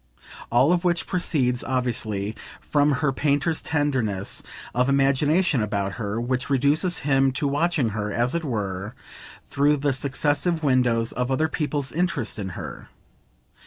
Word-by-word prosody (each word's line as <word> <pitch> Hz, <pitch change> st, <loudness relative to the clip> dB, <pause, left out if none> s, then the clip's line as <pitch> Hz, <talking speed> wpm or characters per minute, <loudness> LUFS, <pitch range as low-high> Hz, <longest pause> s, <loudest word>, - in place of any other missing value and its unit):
All 130 Hz, +8 st, +4 dB
of 175 Hz, 0 st, 0 dB
which 175 Hz, -1 st, +1 dB
proceeds, 135 Hz, -9 st, 0 dB
obviously, 115 Hz, -5 st, -1 dB, 0.2 s
from 145 Hz, 0 st, +2 dB
her 135 Hz, -, +3 dB
painter's 145 Hz, +3 st, 0 dB
tenderness 130 Hz, -11 st, -1 dB, 0.3 s
of 125 Hz, +2 st, +2 dB
imagination 140 Hz, +2 st, +2 dB
about 100 Hz, -2 st, -1 dB
her, 105 Hz, +1 st, -2 dB
which 125 Hz, +3 st, -2 dB
reduces 145 Hz, +7 st, +2 dB
him 135 Hz, -1 st, +3 dB
to 140 Hz, +2 st, 0 dB
watching 145 Hz, -2 st, +1 dB
her, 105 Hz, -1 st, -3 dB
as 120 Hz, +3 st, 0 dB
it 170 Hz, 0 st, -1 dB
were, 105 Hz, -4 st, -3 dB, 0.5 s
through 145 Hz, +2 st, +2 dB
the 140 Hz, 0 st, 0 dB
successive 145 Hz, +5 st, 0 dB
windows 125 Hz, -4 st, +2 dB
of 125 Hz, 0 st, -2 dB
other 135 Hz, +4 st, +1 dB
people's 145 Hz, -3 st, -2 dB
interest 165 Hz, -10 st, -1 dB
in 95 Hz, -2 st, -3 dB
her. -, -, -8 dB
135 Hz, 140 wpm, -24 LUFS, 120-150 Hz, 0.5 s, All